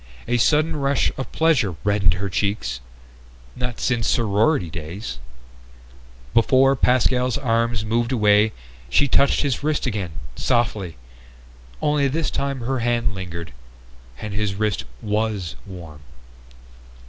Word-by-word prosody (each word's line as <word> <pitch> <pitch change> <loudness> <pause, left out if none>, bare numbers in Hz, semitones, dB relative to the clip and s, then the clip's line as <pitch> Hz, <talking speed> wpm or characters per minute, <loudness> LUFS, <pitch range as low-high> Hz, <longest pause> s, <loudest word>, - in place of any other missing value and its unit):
A 120 +1 +2
sudden 155 +6 +3
rush 140 -1 +1
of 130 - -5
pleasure 130 - +2
reddened 100 -4 +3
her 100 +2 -3
cheeks. 95 - -1 0.8
Not 125 -2 -3
since 120 -3 0
sorority 110 - +2
days... 80 - -6 1.1
Before 130 +3 +4
Pascal's 125 0 +2
arms 115 -3 0
moved 115 +2 0
away 105 -2 +4 0.4
she 140 - +3
touched 140 +1 +3
his 140 -1 -1
wrist 155 0 0
again, 100 -9 -3 0.2
softly, 110 - 0 0.9
only 150 -1 +3
this 155 +3 -1
time 140 -2 -2
her 130 +2 -1
hand 120 -1 0
lingered. 85 -6 -7 0.7
And 105 -1 -5
his 100 -1 -1
wrist 105 -1 -1 0.2
was 105 -4 -1
warm! 85 -6 -10
115 Hz, 120 wpm, -22 LUFS, 100-130 Hz, 1.1 s, Before